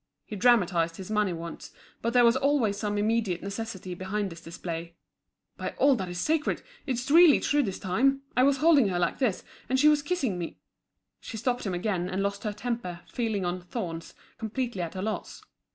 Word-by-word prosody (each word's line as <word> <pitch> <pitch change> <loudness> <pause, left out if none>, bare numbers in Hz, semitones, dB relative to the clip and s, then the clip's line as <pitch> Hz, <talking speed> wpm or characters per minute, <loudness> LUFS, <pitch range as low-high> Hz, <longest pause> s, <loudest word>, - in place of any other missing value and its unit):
He 215 - -7
dramatised 180 -7 +3
his 190 +3 -8
money 210 -3 +2
wants, 170 0 -7 0.3
but 230 - 0
there 245 0 +5
was 235 +1 +5
always 265 -6 +2
some 205 0 -2
immediate 210 -4 0
necessity 200 -2 -5
behind 190 +2 -3
this 165 0 -10
display. 170 0 -6 0.6
"By - - -4
all 280 -1 +5
that's 180 -5 -4
sacred, 305 - 0 0.2
it's 255 0 -2
really 330 -2 +8
true 290 0 +2
this 195 -8 -2
time. 270 +9 +1
I 250 - +4
was 275 +1 +4
holding 300 -6 +5
her 180 -2 -1
like 175 - 0
this, 245 -9 0 0.3
and 260 +1 +2
she 295 - +6
was 300 -1 +3
kissing 280 - -1
me—" 170 - -5 0.6
She 225 - -7
stopped 245 0 -1
him 185 - -1
again, 180 -1 -1
and 190 +1 -1
lost 200 +2 -3
her 210 - 0
temper, 210 -5 -4
feeling 220 -6 -2
on 175 +1 -2
thorns, 175 -3 -6 0.2
completely 230 -2 -3
at 170 0 -4
a 185 - -3
loss. 215 0 -4
210 Hz, 190 wpm, -28 LUFS, 180-250 Hz, 0.6 s, really